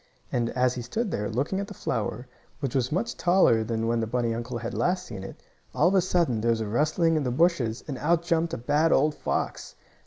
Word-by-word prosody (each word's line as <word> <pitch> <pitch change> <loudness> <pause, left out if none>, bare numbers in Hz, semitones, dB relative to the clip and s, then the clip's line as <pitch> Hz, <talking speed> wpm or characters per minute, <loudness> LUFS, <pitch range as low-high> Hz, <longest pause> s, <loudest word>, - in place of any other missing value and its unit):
And, 120 -1 0
as 125 0 +3
he 125 - -5
stood 205 - -3
there, 105 0 -2
looking 140 - -1
at 200 - -3
the 205 - -9
flower, 115 -1 -3 0.3
which 135 -5 -3
was 130 -2 0
much 190 +9 -1
taller 175 -11 +4
than 115 0 -2
when 115 0 +1
the 115 - -1
bunny 120 0 0
uncle 120 +1 -4
had 115 0 -5
last 180 +1 0
seen 95 - -7
it, - - -10 0.3
all 155 - +4
of - - -1
a 190 - +5
sudden 170 -11 +1
there 115 - +1
was 115 -1 +2
a 110 - -2
rustling 155 - +2
in 150 - 0
the 125 - -1
bushes, 130 -5 +1
and 135 -4 -5
out 170 +2 +2
jumped 170 -1 0
a - - -5
bad 150 +7 +2
old 150 +3 +3
fox. - - -3
130 Hz, 240 wpm, -26 LUFS, 115-170 Hz, 0.3 s, a